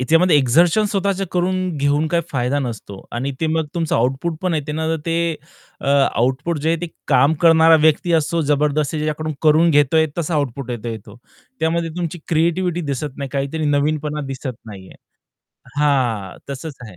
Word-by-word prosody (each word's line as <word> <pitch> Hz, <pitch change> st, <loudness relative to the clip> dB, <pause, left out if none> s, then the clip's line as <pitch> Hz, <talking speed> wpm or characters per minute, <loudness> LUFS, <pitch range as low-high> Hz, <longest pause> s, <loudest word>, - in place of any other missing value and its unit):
ह्याच्यामध्ये 165 Hz, +4 st, +4 dB
एक्झर्शन 165 Hz, -, +3 dB
स्वतःच 195 Hz, -1 st, -1 dB
करून 180 Hz, -1 st, -1 dB
घेऊन 145 Hz, +2 st, +1 dB
काही 170 Hz, 0 st, +1 dB
फायदा 130 Hz, +2 st, 0 dB
नसतो 110 Hz, -6 st, -6 dB
आणि 130 Hz, +4 st, -2 dB
ते 160 Hz, -, +1 dB
मग 160 Hz, 0 st, 0 dB
तुमचं 165 Hz, -2 st, -1 dB
आउटपुट 135 Hz, +8 st, -1 dB
पण 180 Hz, -2 st, 0 dB
आहे 150 Hz, -1 st, -3 dB
ना, 160 Hz, +1 st, -2 dB, 0.2 s
ते 170 Hz, 0 st, 0 dB, 0.5 s
अ, -, -, -6 dB
आउटपुट 140 Hz, +3 st, +1 dB
जे 150 Hz, +2 st, -1 dB
आहे 165 Hz, -1 st, +1 dB
ते 175 Hz, -, -3 dB, 0.2 s
काम 140 Hz, +4 st, +4 dB
करणारा 165 Hz, -1 st, +6 dB
व्यक्ती 160 Hz, +2 st, +2 dB
असो 165 Hz, +1 st, +1 dB
जबरदस्ती 150 Hz, +1 st, 0 dB
ज्याच्याकडून 155 Hz, +1 st, -2 dB
करून 160 Hz, +2 st, +5 dB
घेतोय 150 Hz, +2 st, +3 dB
तसा 170 Hz, 0 st, -1 dB
आउटपुट 140 Hz, -3 st, -2 dB
येतो 115 Hz, -1 st, -4 dB
तो. 105 Hz, +2 st, -13 dB, 0.4 s
त्यामध्ये 165 Hz, +1 st, 0 dB
तुमची 175 Hz, -1 st, -3 dB
क्रिएटिव्हिटी 170 Hz, +2 st, +1 dB
दिसत 140 Hz, -2 st, -4 dB
नाही, 140 Hz, -1 st, -5 dB
काहीतरी 140 Hz, +3 st, -2 dB
नवीनपणा 150 Hz, +1 st, 0 dB
दिसत 135 Hz, -1 st, -5 dB
नाहीये. 95 Hz, -3 st, -11 dB, 0.9 s
हां, 120 Hz, -10 st, 0 dB
तसंच 140 Hz, +2 st, -6 dB
आहे. 95 Hz, -, -13 dB
150 Hz, 165 wpm, -20 LUFS, 135-165 Hz, 0.9 s, करणारा